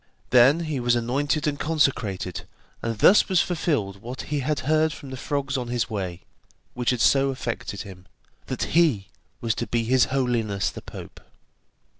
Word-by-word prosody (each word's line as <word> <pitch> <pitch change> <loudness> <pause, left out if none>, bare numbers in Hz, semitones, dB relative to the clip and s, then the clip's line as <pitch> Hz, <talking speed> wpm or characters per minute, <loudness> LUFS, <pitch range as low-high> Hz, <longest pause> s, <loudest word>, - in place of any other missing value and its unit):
Then 140 +3 +4
was 120 0 +2
he - - +3
anointed 145 +6 -1
and 145 -2 -1
consecrated, 130 - -1 0.3
and 115 -1 -3
thus 195 - +6
was 185 -3 +3
fulfilled 110 - -2
what 125 +3 -6
he 145 - +1
had 145 +3 -1
heard 155 +2 +2
from 140 -4 -10
the - - -5
frogs 140 +1 -2
on 125 -2 -3
his 120 -1 -2
way, 95 -4 -4 0.5
which 125 -1 -1
had 125 -2 +1
so 135 0 +4
affected 120 -6 -4
him, 95 -3 -12 0.4
that - - -3
he 135 - +3 0.3
was 115 -2 0
to - - -4
be 120 -1 0
his 125 +2 +3
Holiness 120 -7 0
the - - -9
Pope. - - -10
125 Hz, 170 wpm, -24 LUFS, 115-145 Hz, 0.5 s, thus